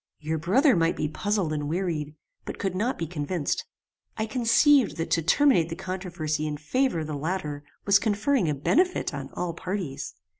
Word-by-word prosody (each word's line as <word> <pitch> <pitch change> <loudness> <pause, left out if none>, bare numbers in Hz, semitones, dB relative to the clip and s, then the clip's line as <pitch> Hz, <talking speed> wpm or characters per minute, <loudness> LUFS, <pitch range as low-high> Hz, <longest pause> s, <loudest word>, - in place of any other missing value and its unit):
Your 160 +1 -2
brother 245 - +4
might 165 -1 +2
be - - -1
puzzled 195 0 -1
and 145 -1 -2
wearied, 160 -4 -2 0.3
but - - -6
could 195 -2 -2
not 225 +8 -1
be 165 - -2
convinced. 160 0 -2 0.5
I 220 - 0
conceived 245 +3 +4
that 165 - -3
to 165 - +3
terminate 180 - +4
the 165 - -4
controversy 175 -5 -3
in 150 -1 -3
favor 215 - 0
of - - -4
the 155 - -5
latter 150 -1 -3 0.2
was 200 0 +5
conferring 215 - +1
a 150 - 0
benefit 355 - +1
on - - -5
all 175 -1 -3
parties. 170 -7 -4
175 Hz, 180 wpm, -26 LUFS, 155-210 Hz, 0.5 s, was